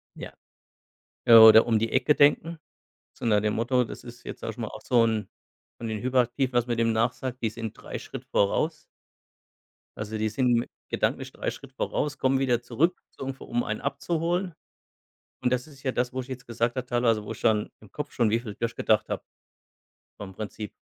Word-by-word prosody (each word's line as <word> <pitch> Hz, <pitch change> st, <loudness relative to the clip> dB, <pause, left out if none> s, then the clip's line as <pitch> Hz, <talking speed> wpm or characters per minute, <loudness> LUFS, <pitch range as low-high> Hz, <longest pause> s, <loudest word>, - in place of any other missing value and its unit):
Ja. -, -, -8 dB, 0.9 s
Äh, 115 Hz, -, +7 dB
oder 110 Hz, 0 st, +10 dB
um 115 Hz, -2 st, +3 dB
die 115 Hz, +1 st, -1 dB
Ecke 130 Hz, +3 st, +3 dB
denken. 160 Hz, +4 st, +3 dB, 0.6 s
So -, -, -8 dB
nach 105 Hz, -2 st, +4 dB
dem 105 Hz, 0 st, 0 dB
Motto, 125 Hz, +2 st, +2 dB
das -, -, -9 dB
ist 120 Hz, 0 st, -12 dB
jetzt, -, -, -8 dB
sage -, -, -3 dB
ich -, -, -15 dB
mal, -, -, -3 dB
auch -, -, -9 dB
so 120 Hz, -2 st, +4 dB
'n 110 Hz, -3 st, -1 dB, 0.5 s
von 115 Hz, -, -5 dB
den 110 Hz, -2 st, -3 dB
Hyperaktiven, 130 Hz, +1 st, +1 dB
was 120 Hz, 0 st, +2 dB
man 120 Hz, -1 st, -1 dB
dem 115 Hz, 0 st, +2 dB
nachsagt, 125 Hz, +3 st, -1 dB
die 115 Hz, -, +1 dB
sind 110 Hz, 0 st, -6 dB
3 -, -, -7 dB
Schritt -, -, -9 dB
voraus. 150 Hz, +10 st, +1 dB, 1.2 s
Also, 105 Hz, +1 st, -4 dB
die 110 Hz, 0 st, 0 dB
sind 120 Hz, +1 st, +1 dB, 0.2 s
gedanklich -, -, -1 dB
3 -, -, -3 dB
Schritt -, -, -12 dB
voraus, 150 Hz, 0 st, -2 dB
kommen 135 Hz, 0 st, +2 dB
wieder 125 Hz, -3 st, +1 dB
zurück, 135 Hz, +9 st, 0 dB
so -, -, -8 dB
ungefähr, 135 Hz, 0 st, -6 dB
um 120 Hz, 0 st, 0 dB
einen 110 Hz, -, -3 dB
abzuholen. 170 Hz, +5 st, -1 dB, 0.9 s
Und 125 Hz, -, +1 dB
das 125 Hz, +2 st, 0 dB
ist 140 Hz, -3 st, -16 dB
ja 130 Hz, -, 0 dB
das, 125 Hz, 0 st, -1 dB
wo 130 Hz, -, -2 dB
ich 125 Hz, -, -10 dB
jetzt 130 Hz, -1 st, -7 dB
gesagt 115 Hz, +1 st, -1 dB
habe, 130 Hz, -1 st, -3 dB
teilweise 120 Hz, -3 st, +1 dB
wo 105 Hz, -, -7 dB
ich 115 Hz, -, -8 dB
dann 110 Hz, -2 st, +2 dB
im 105 Hz, -3 st, -17 dB
Kopf 150 Hz, +5 st, -5 dB
schon 115 Hz, -3 st, +2 dB
wie 115 Hz, -, +2 dB
viel 110 Hz, -4 st, -8 dB
durchgedacht 115 Hz, -2 st, 0 dB
habe -, -, -3 dB, 0.9 s
vom 95 Hz, -2 st, -8 dB
Prinzip. 105 Hz, +1 st, -6 dB
120 Hz, 200 wpm, -27 LUFS, 110-130 Hz, 1.2 s, oder